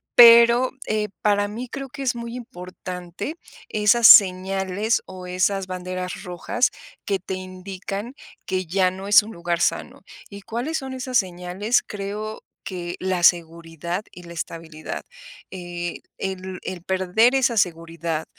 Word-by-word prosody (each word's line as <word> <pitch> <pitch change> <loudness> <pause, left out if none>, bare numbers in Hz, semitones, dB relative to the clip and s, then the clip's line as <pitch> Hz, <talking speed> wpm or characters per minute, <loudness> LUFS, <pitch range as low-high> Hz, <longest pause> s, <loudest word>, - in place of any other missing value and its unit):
pero, 235 +1 +8 0.2
eh, 210 -1 0
para 205 -1 +2
mí 235 +4 -6
creo 275 -1 -6
que 275 - -9
es 255 -2 0
muy 235 0 -6
importante 185 - -7 0.3
esas 215 +2 +5
señales, 190 +2 +5
o 185 -1 -9
esas 185 +1 0
banderas 185 +1 -5
rojas 185 +8 0 0.3
que 195 -1 0
te 190 +1 -5
indican 190 +5 -7 0.3
que 185 -1 -1
ya 185 +2 +2
no 190 +2 -8
es 205 - +8
un 215 +2 -10
lugar 170 0 -2
sano, - - -1 0.3
¿y 200 0 -9
cuáles 245 +10 -3
son 265 -1 -7
esas 255 -1 +1
señales?, 185 +4 -1
creo 210 +2 -5 0.2
que 175 -2 -5
la 185 -2 -1
seguridad 170 +1 +1
y 180 - -12
la 170 - -10
estabilidad. 160 -1 -6 0.5
Eh, 175 -2 -5 0.2
el 190 -1 -5
el 185 -2 -5
perder 190 +6 +2
esa 255 -3 +2
seguridad, 165 -3 -1
190 Hz, 140 wpm, -23 LUFS, 180-220 Hz, 0.5 s, pero